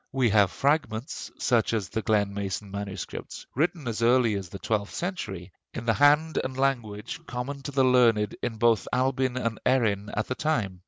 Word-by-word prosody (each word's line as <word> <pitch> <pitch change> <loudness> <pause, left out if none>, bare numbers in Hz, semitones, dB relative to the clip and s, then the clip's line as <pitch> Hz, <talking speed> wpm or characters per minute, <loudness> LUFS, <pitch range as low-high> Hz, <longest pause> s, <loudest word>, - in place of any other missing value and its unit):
We 130 -4 +2
have 100 -2 +5
fragments, 140 -2 -1
such 115 -2 +2
as 105 -5 -2
the 110 - -2
Glen 105 -2 +1
mason 100 0 -4
MS., 100 -2 -4 0.5
written 160 0 -1
as 115 -1 -3
early 120 -1 +4
as 95 -3 -4
the 100 - -7
twelfth 105 0 -2
century, 105 - -4 0.2
in 115 - -5
the 115 - +3
hand 150 +4 +4
and 130 0 -5
language 130 +2 -2
common 125 +3 -4
to 145 - -6
the 135 -1 +2
learned 115 -5 +4
in 115 - -3
both 115 -1 +3
Albin 130 0 +1
and 115 -3 -2
Erin 105 -6 +1
at 110 - +1
the - - -2
time. 115 -11 -1
115 Hz, 180 wpm, -27 LUFS, 105-130 Hz, 0.5 s, have